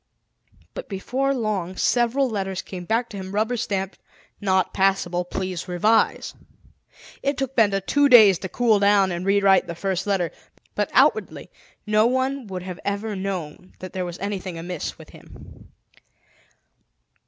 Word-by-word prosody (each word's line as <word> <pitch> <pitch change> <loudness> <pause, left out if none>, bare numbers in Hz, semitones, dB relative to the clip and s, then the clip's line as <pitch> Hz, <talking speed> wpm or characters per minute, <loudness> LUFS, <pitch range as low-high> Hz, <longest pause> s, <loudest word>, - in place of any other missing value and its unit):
But - - -8
before 255 +8 -1
long, 210 -8 -2
several 245 +3 +2
letters 195 -5 -3
came 180 -2 -8
back 230 +5 0
to 205 - -8
him 190 -1 -7
rubber 220 +4 0
stamped: 195 -5 -3 0.4
"Not 190 -2 +1
passable. 190 -2 +1
Please 185 0 -4
revise." 195 +6 +1 0.9
It 280 -1 -1
took 270 -1 -3
Benda 200 -4 +3
two 285 +8 +2
days 215 -8 +8
to 190 - -6
cool 225 +1 +2
down 200 -1 +4
and 175 +2 -4
rewrite 195 -1 +4
the 170 - -5
first 190 +2 -2
letter. 190 -4 0 0.4
But - - -1
outwardly - - +2 0.3
no 215 +1 +3
one 260 0 -1
would 185 -2 -6
have 180 -1 -7
ever 205 +1 -3
known 185 -3 -5
that 185 - -9
there 185 - -2
was 175 0 -6
anything 190 -3 -4
amiss 175 +2 -5
with - - -14
him. - - -15
195 Hz, 150 wpm, -23 LUFS, 185-225 Hz, 0.9 s, days